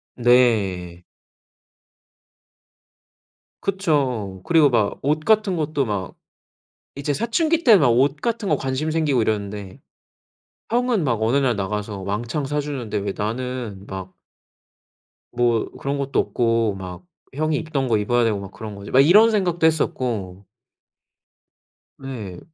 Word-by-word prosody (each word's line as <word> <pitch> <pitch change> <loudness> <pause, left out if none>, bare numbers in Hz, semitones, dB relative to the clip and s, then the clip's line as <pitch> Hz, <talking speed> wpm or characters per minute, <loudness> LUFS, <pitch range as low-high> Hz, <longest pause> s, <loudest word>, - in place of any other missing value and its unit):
네. 105 -8 +2 2.6
그쵸. 135 - -1
그리고 160 -4 +5
막 110 -5 0
옷 150 +2 +1
같은 210 0 +2
것도 150 -3 -1
막 100 -4 -4 0.8
이제 140 +1 -2
사춘기 315 - 0
때 230 -4 +7
막 140 -7 +3
옷 135 +4 +3
같은 230 -4 -2
거 - - +3
관심 135 +4 -2
생기고 150 -7 +1
이러는데 100 -3 -3 0.9
형은 240 -5 +1
막 120 -5 0
어느 115 +5 +2
날 130 -5 +2
나가서 100 +1 -3
왕창 115 +9 -3
사주는데 140 -7 -3
'왜 100 -1 -2
나는 115 -2 -4
막' 95 -1 -7 1.2
'뭐 120 -2 +2
그런 140 +1 -2
것도 140 -1 -1
없고 115 -3 +1
막 90 - -8 0.3
형이 155 +1 0
입던 145 -5 -2
거 115 - +2
입어야 120 +4 +1
되고 110 -3 +1
막 100 -1 -8
그런 110 -2 -8
거지?' 100 0 -9
막 130 - +5
이런 210 +9 +6
생각도 175 -5 +1
했었고 110 - -2 1.5
네. 110 -10 -7
125 Hz, 225 characters per minute, -22 LUFS, 105-155 Hz, 2.6 s, 때